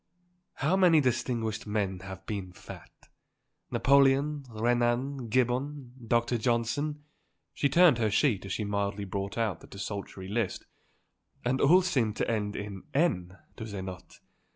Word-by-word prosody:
How 155 +7 +1
many 180 -4 +5
distinguished 115 -5 -1
men 100 -3 -1
have 95 0 -9
been 95 -4 -5
fat. - - -11 0.8
Napoleon, 140 +1 +3
Renan, 120 +3 0
Gibbon, 130 +2 0
Dr. 120 +1 +1
Johnson 125 +6 -1 0.2
" - - -49
she 140 - +1
turned 160 -3 +5
her 110 -2 +2
sheet 105 -1 +2
as - - -6
she 110 - -2
mildly 100 0 -2
brought 100 +2 -4
out 110 -7 0
the - - -15
desultory 100 -1 -6
list. 105 -1 -2 0.8
"And 130 +2 +1
all 180 +6 +6
seem 125 - +1
to - - -1
end 105 -2 -1
in 100 -2 -6
n, 95 - +1 0.2
do - - -7
they 100 -3 -5
not? 95 -1 -9
115 Hz, 145 wpm, -29 LUFS, 100-135 Hz, 0.8 s, all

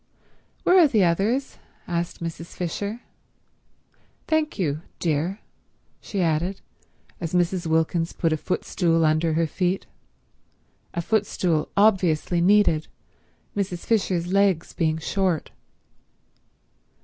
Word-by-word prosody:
"Where 370 +1 +6
are 335 - +7
the 220 -8 +3
others?" 205 +10 0 0.3
asked 170 -1 -3
Mrs. 165 0 -6
Fisher. 200 +6 -3 1.3
"Thank 315 -1 0
you—dear," 165 +2 -2 0.6
she 195 -3 -2
added, 170 +4 0 0.6
as 170 0 -3
Mrs. 175 0 +1
Wilkins 160 +1 +1
put 165 -2 0
a - - 0
footstool 165 -1 0
under 155 +1 +2
her 165 +1 +2
feet, 180 +4 -1 1.1
a 170 - -1
footstool 180 -6 0
obviously 180 -5 +3
needed, 185 -4 +4 0.7
Mrs. 185 -4 -3
Fisher's 185 -5 0
legs 195 -4 +2
being 160 -2 0
short. 180 0 -1
175 Hz, 100 wpm, -24 LUFS, 165-200 Hz, 1.3 s, are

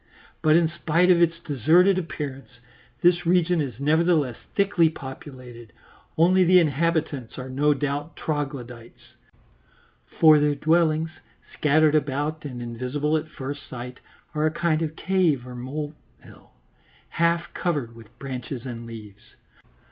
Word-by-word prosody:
But 155 0 +4
in 170 -1 +4
spite 170 +2 +2
of 175 -1 +4
its 165 -1 +3
deserted 170 - +3
appearance, 135 -8 -7 0.5
this 175 0 +4
region 175 -1 +3
is 130 -5 -5
nevertheless 155 -3 +2 0.2
thickly 195 -5 +3
populated, 130 -5 -10 0.4
only 185 +3 +5
the 180 +1 +5
inhabitants 155 -5 -1
are 130 0 -7
no 145 +3 +2
doubt 145 +3 -3
troglodytes, 130 -6 -6 1.1
for 155 -2 +7
their 145 0 +2
dwellings, 160 +1 +1 0.4
scattered 155 +1 +3
about 150 +1 -1
and 125 -4 -6
invisible 130 +6 -2
at 155 0 -2
first 140 -1 -7
sight, 125 0 -8 0.3
are 155 0 +1
a - - 0
kind 160 0 0
of 160 -1 -3
cave 170 -10 +1
or 125 - -9
molehill, 145 +5 -9 0.6
half 170 0 0
covered 145 -10 -2
with 115 0 -16
branches 130 -1 -6
and 120 -2 -7
leaves. 105 -3 -12
150 Hz, 130 wpm, -24 LUFS, 130-165 Hz, 1.1 s, for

